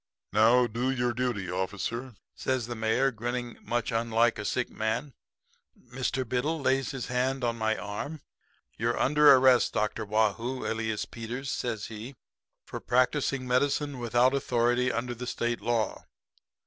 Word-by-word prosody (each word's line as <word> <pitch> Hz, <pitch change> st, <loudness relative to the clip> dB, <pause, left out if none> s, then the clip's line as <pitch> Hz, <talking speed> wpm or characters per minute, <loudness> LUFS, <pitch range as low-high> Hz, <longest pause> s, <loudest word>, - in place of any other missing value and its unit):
"'Now 115 Hz, +4 st, +5 dB
do 120 Hz, +3 st, -1 dB
your 125 Hz, -2 st, 0 dB
duty, 115 Hz, -7 st, -2 dB
officer,' 105 Hz, +6 st, -3 dB, 0.2 s
says 130 Hz, -3 st, -1 dB
the 120 Hz, -, -5 dB
mayor, 115 Hz, +4 st, +1 dB
grinning 120 Hz, +1 st, -4 dB
much 120 Hz, -1 st, -2 dB
unlike 115 Hz, 0 st, +2 dB
a 105 Hz, -, -4 dB
sick 125 Hz, +3 st, -1 dB
man. 110 Hz, +6 st, -2 dB, 0.8 s
"Mr. 130 Hz, 0 st, -1 dB
Biddle 145 Hz, +7 st, -1 dB
lays 135 Hz, -1 st, +1 dB
his 135 Hz, -4 st, -4 dB
hand 130 Hz, +1 st, -1 dB
on 120 Hz, -1 st, +1 dB
my 110 Hz, -1 st, 0 dB
arm. 105 Hz, -, -5 dB, 0.6 s
"'You're 115 Hz, +2 st, 0 dB
under 150 Hz, +2 st, +6 dB
arrest, 130 Hz, -2 st, +5 dB
Dr. 105 Hz, +1 st, -1 dB
Waugh 110 Hz, 0 st, +2 dB
hoo, 125 Hz, +4 st, -5 dB
alias 110 Hz, -1 st, -2 dB
Peters,' 120 Hz, +4 st, -5 dB
says 110 Hz, -3 st, -3 dB
he, 115 Hz, +5 st, -8 dB, 0.5 s
'for -, -, -6 dB
practising 130 Hz, +1 st, +1 dB
medicine 140 Hz, +2 st, +1 dB
without 120 Hz, +2 st, +3 dB
authority 125 Hz, -1 st, +1 dB
under 120 Hz, +1 st, -2 dB
the 125 Hz, +1 st, -7 dB
State 120 Hz, -1 st, -2 dB
law.' 115 Hz, 0 st, -1 dB
120 Hz, 150 wpm, -28 LUFS, 115-130 Hz, 0.8 s, under